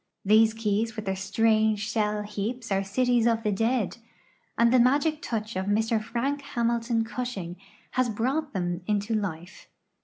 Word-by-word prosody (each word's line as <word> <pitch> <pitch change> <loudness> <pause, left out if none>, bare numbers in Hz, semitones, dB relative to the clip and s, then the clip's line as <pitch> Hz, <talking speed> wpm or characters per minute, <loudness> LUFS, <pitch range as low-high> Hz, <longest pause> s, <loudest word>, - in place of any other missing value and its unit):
These 220 +2 +5
ke\'s 225 +1 -1
with 215 -2 -5
their 190 0 -1
strange 215 +1 +1
shell 210 -1 0
heaps 210 +3 -4
are 195 0 +2
cities 240 +3 +2
of 230 -1 +1
the 210 - +1
dead, 225 +2 0 0.6
and 235 +1 +4
the 255 - +6
magic 290 +5 +3
touch 225 -8 -4
of 190 +1 -2
Mr 220 +2 +1
Frank 265 +6 -2
Hamilton 235 -3 0
Cushing 225 -7 -5 0.4
has 255 -1 +1
brought 265 +8 -1
them 175 -3 -2
into 210 +1 0
life. 185 -4 -4
225 Hz, 155 wpm, -27 LUFS, 205-240 Hz, 0.6 s, the